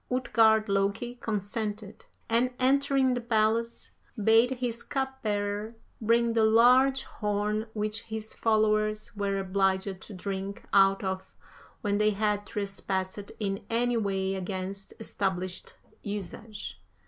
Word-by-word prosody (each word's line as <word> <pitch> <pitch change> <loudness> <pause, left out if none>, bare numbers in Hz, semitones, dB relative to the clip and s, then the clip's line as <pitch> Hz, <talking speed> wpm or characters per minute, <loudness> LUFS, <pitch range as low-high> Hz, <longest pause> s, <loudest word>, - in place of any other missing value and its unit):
Utgard 225 -4 +3
Loki 200 +5 -1
consented, 210 0 -4 0.2
and 235 +2 +3
entering 270 0 +3
the 245 - -2
palace, 230 0 0 0.3
bade 225 +3 +5
his 240 -2 -3
cupbearer 220 -6 -2 0.3
bring 230 +1 +3
the 225 -1 +3
large 250 +5 +5
horn 210 +1 -2
which 215 +1 -2
his 220 -1 -6
followers 215 -1 +1
were 200 -1 -1
obliged 190 0 0
to 210 - -10
drink 195 +1 -4
out 195 0 +5
of 190 0 -4 0.5
when 205 -3 0
they 210 0 +4
had 210 0 0
trespassed 195 -2 -3
in 195 -2 -2
any 240 +1 +1
way 195 -3 0
against 190 +1 -5
established 185 -4 -3 0.3
usage. 210 +1 -6
215 Hz, 115 wpm, -28 LUFS, 200-230 Hz, 0.5 s, bade